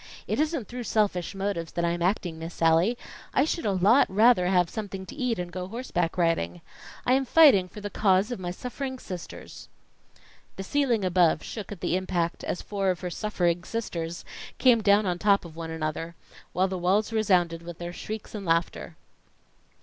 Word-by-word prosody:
It - - -2
isn't 305 - 0
through 245 -1 -6
selfish 200 -4 0
motives 195 -4 -3
that 170 - 0
I 170 - +1
am 175 0 -3
acting, 175 -3 -1
Miss 165 +1 -7
Sallie. 165 +8 +3 0.4
I 265 - +4
should 330 -4 -2
a - - +2
lot 195 +8 +4
rather 210 -2 +4
have 180 -2 +3
something 195 -1 -6
to - - -10
eat 250 -5 -1
and 175 -1 -4
go 180 0 -5
horseback 190 -7 -2
riding. 90 - 0 0.4
I 250 - +3
am 270 +1 +3
fighting 260 - +6
for 210 - -10
the 205 0 -5
cause 195 +2 +2
of 245 - -4
my 180 -1 -4
suffering 260 +7 -5
sisters." 180 -8 -9 0.9
The 195 - -5
ceiling 240 -3 +1
above 175 -3 +3
shook 215 -3 -7
at 200 - -8
the - - 0
impact, 180 -2 -1
as - - -3
four 195 -2 -1
of 180 -2 -1
her 180 -1 -4
suffering 175 -4 -1
sisters 170 -6 -4 0.3
came 245 -3 +5
down 205 0 +4
on 175 -1 -1
top 200 -1 +3
of 160 -2 -11
one 165 0 -6
another, 160 +1 -4 0.4
while 185 +2 +1
the 185 -1 -4
walls 200 +5 +1
resounded 180 -6 +2
with 170 -1 -9
their 175 0 -6
shrieks 215 +3 -7
and 210 -2 -5
laughter. 165 -1 -1
190 Hz, 190 wpm, -27 LUFS, 175-220 Hz, 0.9 s, fighting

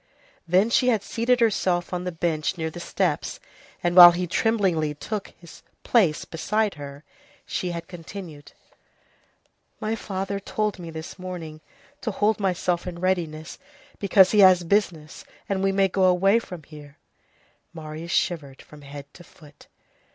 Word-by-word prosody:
Then 190 +7 +3
she 250 - +3
had 220 -5 +2
seated 240 +3 0
herself 185 -6 +1
on 180 0 -3
the 180 - -2
bench 165 0 -2
near 160 -1 -3
the 175 - -9
steps, - - -2 0.4
and 175 0 0
while 175 -1 +11
he 180 +1 -2
tremblingly 175 -6 0
took 210 +7 -5
his 170 -2 -14 0.2
place 180 -10 +2
beside 210 +5 -1
her, 145 -1 -10 0.4
she 180 - -3
had 170 -1 -6
continued:— 170 -3 -10 1.3
"My 215 +1 -2
father 195 -2 -4
told 210 0 -2
me 170 -1 -8
this 160 +3 -8
morning 170 -4 -7 0.4
to 230 - -2
hold 210 +1 +1
myself 180 -2 -1
in 175 -1 -6
readiness, 170 -4 -2 0.4
because 195 -2 +5
he 210 - +3
has 185 -2 +7
business, 170 -4 -1 0.2
and 195 -1 -1
we 195 0 +2
may 195 0 +3
go 190 0 +1
away 195 +4 +4
from 180 -8 -10
here." 145 -1 -14 0.7
Marius 160 0 -8
shivered 145 -9 -1
from 150 -1 -15
head 140 0 -10
to 175 - -14
foot. 150 -3 -18
180 Hz, 150 wpm, -24 LUFS, 160-195 Hz, 1.3 s, while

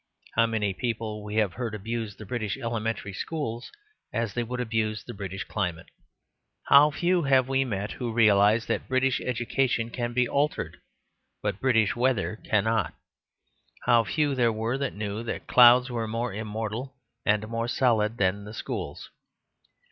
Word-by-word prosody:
How 115 0 +4
many 105 -3 -1
people 110 -1 -3
we 105 0 -6
have 105 -4 +2
heard 115 -3 -4
abuse 110 0 -4
the 110 - -10
British 110 -1 -3
elementary 115 -5 -3
schools, 120 -2 -4 0.4
as 115 -3 -2
they 120 - -1
would 125 +2 -4
abuse 110 -3 -1
the - - -8
British 95 -1 -5
climate? 90 -5 -4 0.7
How 145 +2 +7
few 175 +4 +1
have 135 -3 +3
we 135 0 +2
met 105 -4 -3
who 120 -3 -4
realised 110 0 +4
that - - -2
British 130 0 +1
education 120 -1 0
can 120 -1 -3
be 125 0 +2
altered, 145 +4 -1 0.7
but 95 - -2
British 115 -5 +3
weather 120 -4 0
cannot? 110 +1 0 0.9
How 120 -2 +5
few 145 +4 0
there 120 -3 +2
were 115 +4 -2
that 140 -2 -2
knew 105 +1 -3
that 115 - -4
the - - -10
clouds 125 +1 +7
were 115 -2 -2
more 115 0 -2
immortal 110 +4 -4 0.3
and 105 0 +1
more 115 +1 -2
solid 115 -3 +2
than 100 -1 +1
the 105 +1 -9
schools? - - -5
115 Hz, 160 wpm, -27 LUFS, 105-125 Hz, 0.9 s, How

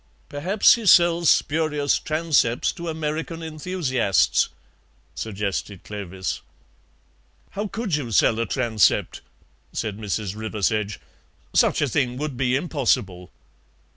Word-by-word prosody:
"Perhaps 180 +9 +4
he 230 -3 -2
sells 170 -2 +5
spurious 150 -2 +2
transepts 155 -7 +1
to 170 -2 -6
American 160 +1 -4
enthusiasts," 155 - +1 0.6
suggested 100 -2 -4
Clovis. 95 -3 -5 1.1
"How 205 +2 -3
could 210 -2 -4
you 140 -5 -3
sell 110 +1 +3
a 115 - -1
transept?" 115 -5 +1 0.5
said 105 -1 -3
Mrs. 105 -1 -3
Riversedge; 105 -1 -2 0.5
"such - - +3
a - - +1
thing 125 -1 0
would 150 -1 -4
be 125 0 +1
impossible." 115 - -1
135 Hz, 105 wpm, -23 LUFS, 105-160 Hz, 1.1 s, sells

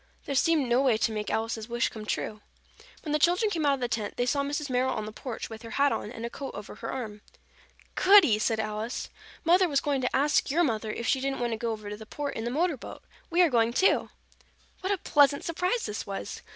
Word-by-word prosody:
There 280 - -3
seemed 295 0 +3
no 240 +2 +3
way 255 -5 +3
to 225 - +1
make 210 -1 -3
Alice's 225 0 -2
wish 240 +1 +1
come 215 -1 -9
true. 215 0 -3 0.6
When 305 - -4
the 300 - +2
children 360 +7 +3
came 320 -5 0
out 280 - +4
of 265 - -10
the 245 - +1
tent, 220 -3 -3
they 245 - +1
saw 280 +3 +1
Mrs. 290 +1 -2
Merrill 255 0 +1
on 215 - -3
the 215 - -6
porch 230 +1 -6
with 220 -1 -9
her 230 - -9
hat 280 0 +4
on 210 - -3
and 230 -1 -6
a - - -3
coat 275 -1 -7
over 205 0 -8
her - - -6
arm. 215 -5 -5 0.7
"Goody!" 370 - +6
said 220 0 0
Alice. 215 +2 -3 0.3
"Mother 360 +2 +4
was 280 -2 +2
going 280 -2 -1
to 250 - -1
ask 285 +2 +2
your 335 +5 +3
mother 220 -6 -1
if 235 - -5
she 265 +2 +2
didn't 275 0 -2
want 240 -1 -1
to - - -2
go 230 +1 -2
over 215 -2 -6
to 205 0 -5
the 220 0 -11
Port 290 +3 -4
in 225 - -4
the - - -1
motor 315 +3 0
boat. - - -10 0.3
We 350 +2 +4
are 340 - +4
going, 230 -1 +3
too." 380 +9 +3 0.7
What 380 +1 -2
a 400 - +2
pleasant 285 -4 +3
surprise 360 +8 -1
this 210 - -5
was! 195 -1 -5
255 Hz, 250 wpm, -28 LUFS, 220-295 Hz, 0.7 s, Goody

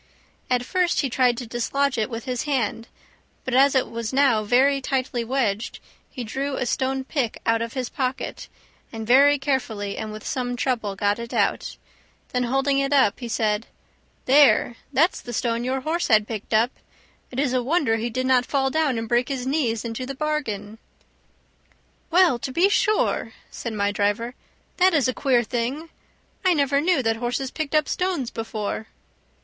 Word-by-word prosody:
At 250 -1 +1
first 360 +3 +1
he 270 -4 -2
tried 250 -1 +2
to 245 - -5
dislodge 265 +4 -1
it 220 0 -1
with 230 0 -6
his 250 0 -2
hand, 235 -5 -1 0.6
but 255 - -3
as 270 +2 +5
it 260 - +2
was 230 -1 -4
now 260 -5 +3
very 265 +5 +3
tightly 255 -3 -1
wedged 230 -4 -1 0.3
he 250 - -6
drew 270 +5 -3
a 255 - -2
stone 265 +2 -1
pick 260 -4 -2
out 230 0 +2
of 230 0 -4
his 255 -3 -2
pocket, 260 +1 -4 0.4
and 225 -1 -6
very 280 +5 +6
carefully 240 -7 -2
and 215 -1 -4
with 215 0 -9
some 250 -4 -2
trouble 230 -6 -1
got 205 +2 0
it 235 0 -6
out. - - 0 0.5
Then 250 -1 0
holding 270 +2 +1
it 275 0 0
up 260 -8 +3
he 240 - -5
said, 220 -1 0 0.6
"There, 270 -3 +5 0.2
that's 315 +6 +2
the 240 - -8
stone 235 0 -1
your 260 +1 -1
horse 325 +5 -1
had 215 -2 +4
picked 215 -3 -6
up. 225 +3 +3 0.6
It 255 - -5
is 275 -3 +1
a 255 - +2
wonder 260 -4 +1
he 230 +2 -2
did 255 +3 -2
not 255 -1 +4
fall 270 -2 +1
down 305 -5 +1
and 225 0 -3
break 240 +3 +1
his 260 -2 -3
knees 255 -6 0
into 235 +2 -4
the 275 - -5
bargain!" 225 -9 -3 1.3
"Well, 345 -7 +4
to 260 - -4
be 350 +8 +3
sure!" 425 +1 +1 0.2
said 235 - -5
my 200 -1 0
driver; 205 +4 -1 0.4
"that 370 -1 +4
is 280 -5 +3
a 255 - 0
queer 250 -3 +2
thing! 250 +8 -3 0.5
I 370 -2 +4
never 280 -1 +2
knew 320 -4 +2
that 225 -1 +1
horses 245 +3 -2
picked 310 -1 -3
up 305 -1 +3
stones 360 -9 -1
before." 220 -1 -4
255 Hz, 180 wpm, -24 LUFS, 230-275 Hz, 1.3 s, very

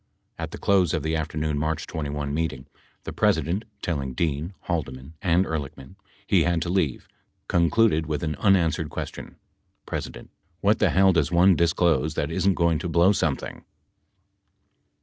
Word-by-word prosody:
At - - -4
the - - -8
close 95 -4 +2
of 80 - -3
the 80 +1 -1
afternoon 75 -1 -2
March 80 +1 -2
21 75 -2 -4
meeting, 75 -5 -2 0.4
the - - -6
President, 95 +7 +1 0.2
telling 70 -6 -3
Dean, 80 +4 -2
Haldeman 70 -4 -4
and 90 0 +2
Ehrlichman 75 -1 -6 0.3
he 95 -3 +3
had 85 0 +1
to 85 - -4
leave, 85 -8 -1 0.4
concluded 85 -1 +2
with 75 +1 -2
an 75 -2 -1
unanswered 85 -6 +2
ques - - -5
tion: - - -10 0.5
P. - - -2 0.6
What 105 +2 +3
the 105 - +3
hell 95 +3 +4
does 80 -1 +1
one 90 +2 +5
disclose 80 -3 +1
that 75 +2 -2
isn't 95 +3 +1
going 85 -2 +2
to 85 - -4
blow 85 +4 +4
something? 80 -8 -2
80 Hz, 155 wpm, -25 LUFS, 75-90 Hz, 0.6 s, one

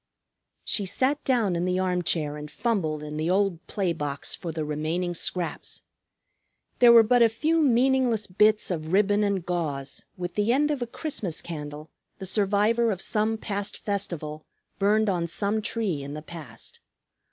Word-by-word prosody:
She 200 -3 +1
sat 270 +9 0
down 230 -9 +2
in 170 - -1
the 180 0 0
armchair 175 -5 0
and 150 0 -7
fumbled 160 -11 -1
in 150 0 -6
the 155 +2 -1
old 190 -2 +1
play 190 -4 -1
box 145 -3 -3
for 170 - -5
the 160 -1 -3
remaining 160 +4 -2
scraps. 175 0 -3 1.0
There 240 -1 +8
were 230 -1 +9
but 245 +2 +3
a 230 - +7
few 315 +9 +1
meaningless 255 -4 +3
bits 210 +2 +3
of 160 -1 -3
ribbon 205 +1 +3
and 200 -4 0
gauze, 145 -6 -3
with 175 -1 -4
the 210 +2 +1
end 295 +4 +2
of 285 -4 -2
a 240 - -2
Christmas 225 - -3
candle, 150 -1 -7 0.3
the 190 - -7
survivor 210 +4 +2
of 195 -4 -1
some 215 +2 0
past 205 -1 -4
festival, 160 -7 -4 0.4
burned 215 +2 +3
on 175 -4 0
some 205 +5 -1
tree 210 -9 -2
in 140 +1 -6
the 150 - -7
past. 155 -9 -10
190 Hz, 165 wpm, -26 LUFS, 160-220 Hz, 1.0 s, were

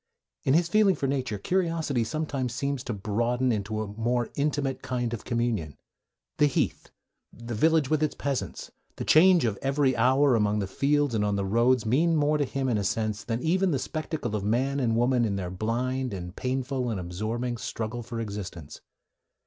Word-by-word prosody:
In 135 - +4
his 170 0 +3
feeling 200 0 +4
for 140 - -3
nature, 130 -5 -1
curiosity 165 - 0
sometimes 140 -2 -3
seems 140 -2 -2
to - - -3
broaden 120 +5 0
into 110 0 -2
a - - -6
more 115 +3 -1
intimate 140 -2 -1
kind 120 -2 -2
of 115 - -6
communion. 115 - -1 0.6
The 150 - +5
heath, 140 - -1 0.4
the 120 0 -7
village 155 +4 +2
with 155 -1 +2
its 155 -2 0
peasants, 140 -2 -3 0.2
the - - -5
change 175 -1 +6
of 105 -4 -1
every 135 -1 +2
hour 135 +2 +4
among 105 -2 +2
the 100 - 0
fields 145 +6 +1
and 105 -2 +1
on 105 -1 +1
the 100 -1 -1
roads, 115 +4 +2
mean 160 +9 +3
more 150 0 +2
to 145 - +2
him, 135 0 -2
in 115 -4 +1
a - - -1
sense, 110 +2 -1
than 115 +1 -3
even 185 +4 +2
the 145 - +1
spectacle 155 -6 -3
of 105 - -2
man 130 +7 +1
and 115 -4 +1
woman 120 +1 +2
in 105 -3 0
their 90 -2 -4
blind, 120 +4 -2
and 90 -1 -7
painful, 130 0 -2
and 110 -4 -2
absorbing 110 +7 -3
struggle 110 +1 -4
for 115 0 -6
existence. 100 -8 -6
125 Hz, 190 wpm, -27 LUFS, 110-140 Hz, 0.6 s, change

